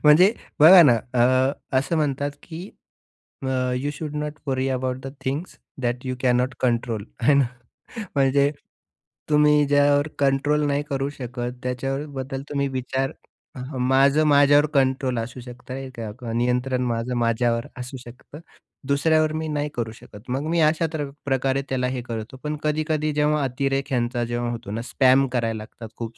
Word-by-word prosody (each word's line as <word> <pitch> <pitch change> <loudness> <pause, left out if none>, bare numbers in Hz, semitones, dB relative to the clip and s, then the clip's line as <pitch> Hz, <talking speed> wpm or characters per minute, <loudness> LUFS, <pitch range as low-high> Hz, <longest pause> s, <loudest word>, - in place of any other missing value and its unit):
म्हणजे 175 +7 +7 0.3
बघा 175 +4 +10
ना 125 -7 +6 0.2
अ, 120 0 +5 0.5
असं 140 +5 -1
म्हणतात 145 -2 0
की, 175 +3 -8 0.8
अ, - - -2 0.3
you 140 +3 -2
should 150 0 -6
note 150 0 -3
worry 130 0 0
about 130 -1 -1
the 135 - -6
things 140 +7 -4 0.2
that 120 +1 -2
you 130 0 -2
cannot 125 0 +2
control 115 -4 0 0.2
आहे 130 +5 +5
ना. 140 -2 +4 0.7
म्हणजे, 140 +1 +3 0.8
तुम्ही 150 0 +4
ज्यावर 145 +1 +3
कंट्रोल 145 +2 +2
नाही 145 +1 0
करू 135 0 -1
शकत 125 -1 -5
त्याच्याबद्दल 135 +1 -3
तुम्ही 140 -1 0
विचार 130 0 -2 0.7
माझं 135 +4 +4
माझ्यावर 145 0 +5
कंट्रोल 130 -2 +1
असू 120 +3 -6
शकतं. 125 +2 -8 0.5
नियंत्रण 125 +1 0
माझं 120 +1 -2
माझ्यावर 115 0 +1
असू 125 +2 -6
शकतं. 125 +4 -12 0.5
दुसऱ्यावर 155 +2 +2
मी 160 - -3
नाही 150 -1 -2
करू 115 -2 -2
शकत. 110 -2 -13
मग 135 +4 -1
मी 170 0 +1
अशा 155 +1 +3
त्र 145 -3 -3 0.2
प्रकारे 135 0 +1
त्याला 125 -1 0
हे 125 - -3
करतो 115 +1 -6
पण 150 0 -2
कधी-कधी 155 0 0
जेव्हा 150 0 +2
अतिरेक 135 +1 -1
ह्यांचा 120 -2 0
जेव्हा 120 0 -2
होतो 115 -4 -6
ना, 110 +2 -3
स्पॅम 130 +2 +3
करायला 115 -3 0
लागतात 110 +1 -10
खूप 115 -1 -6
135 Hz, 150 wpm, -23 LUFS, 125-145 Hz, 0.8 s, बघा